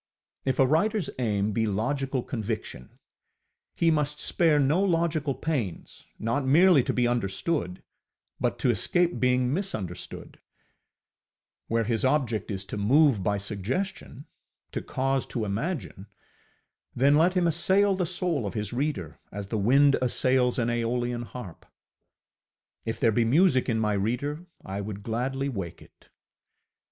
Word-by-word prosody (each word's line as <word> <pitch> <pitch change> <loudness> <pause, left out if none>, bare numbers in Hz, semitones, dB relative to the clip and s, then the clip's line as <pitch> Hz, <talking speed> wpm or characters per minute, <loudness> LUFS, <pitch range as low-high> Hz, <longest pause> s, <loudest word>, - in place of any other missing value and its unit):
If 130 -1 0
a 135 - +5
writerŌĆÖs 185 - +1
aim 105 -3 0
be 110 +2 0
logical 130 +5 -1
conviction, 110 - -5 0.8
he 165 -1 +3
must 150 -1 0
spare 165 -4 +2
no 145 +6 +3
logical 165 -6 +1
pains, 130 - -4
not 115 +6 -1
merely 155 +3 +6
to - - 0
be 125 -1 +1
understood, 120 - -2 0.6
but - - 0
to - - +2
escape 175 0 +1
being 125 0 +2
misunderstood; 110 - -5 1.3
where 115 0 +1
his 115 0 -1
object 130 -6 +1
is 95 -2 -4
to 100 - -6
move 130 +2 +4
by 100 +2 0
suggestion, 125 - -4 0.5
to - - -3
cause 135 0 -1
to 115 -3 -3
imagine, 105 - -4 0.9
then 140 +3 +4
let 175 +5 +3
him 180 -1 +2
assail 190 +5 +3
the 185 -2 -1
soul 175 - -1
of 95 - -6
his 105 -1 -3
reader 120 - -3
as 100 0 -6
the 110 - -1
wind 135 +7 +4
assails 125 0 +2
an 120 -1 +1
aeolian 120 +1 -1
harp. 115 -9 -9 1.2
If 115 - -3
there 115 - +3
be 115 +2 +2
music 130 +2 +3
in 110 -1 +1
my 105 -1 +1
reader, 140 - -2 0.2
I 95 +1 -4
would 100 0 -6
gladly 130 +5 -2
wake 95 -10 -5
it. - - -20
125 Hz, 140 wpm, -27 LUFS, 110-150 Hz, 1.3 s, merely